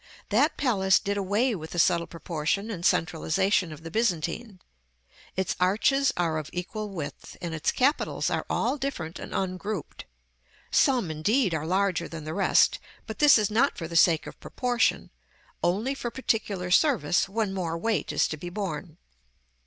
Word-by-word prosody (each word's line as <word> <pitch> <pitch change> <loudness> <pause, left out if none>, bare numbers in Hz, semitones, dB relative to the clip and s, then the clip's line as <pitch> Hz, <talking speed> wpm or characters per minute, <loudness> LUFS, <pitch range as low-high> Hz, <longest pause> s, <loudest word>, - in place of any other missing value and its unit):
That - - +2
palace 195 -9 +3
did 200 0 -2
away 205 +6 +1
with 160 -5 -6
the - - -5
subtle 170 -1 +3
proportion 170 +5 -2
and 175 -5 -6
centralization 170 +3 +1
of 155 +1 -10
the 165 - -7
Byzantine. 210 0 -1 0.8
Its 190 -1 -1
arches 230 +9 +3
are 165 -3 0
of 155 - -7
equal 210 +4 -4
width, 165 -7 -7
and 170 -2 -5
its 160 0 0
capitals 275 +4 +1
are - - 0
all 295 - 0
different 190 -12 -4
and - - -8
ungrouped; 190 0 -4 0.7
some, 245 - +3
indeed, 195 - +1
are 155 0 -2
larger 185 -2 +1
than 165 -2 -8
the 155 +1 -5
rest, 200 - +3 0.3
but 220 - -7
this 295 -4 +7
is 210 -1 0
not 250 +6 +2
for 165 - -4
the 170 - -8
sake 165 -1 +4
of - - -10
proportion, 245 -1 0 0.5
only 210 +10 0
for 250 -3 -4
particular 205 -7 -2
service 235 - +3
when 210 -1 -1
more 170 -3 -2
weight 195 -4 -1
is 150 - +2
to 155 - -4
be 175 +4 -7
borne. 185 -3 -5
190 Hz, 165 wpm, -27 LUFS, 165-220 Hz, 0.8 s, this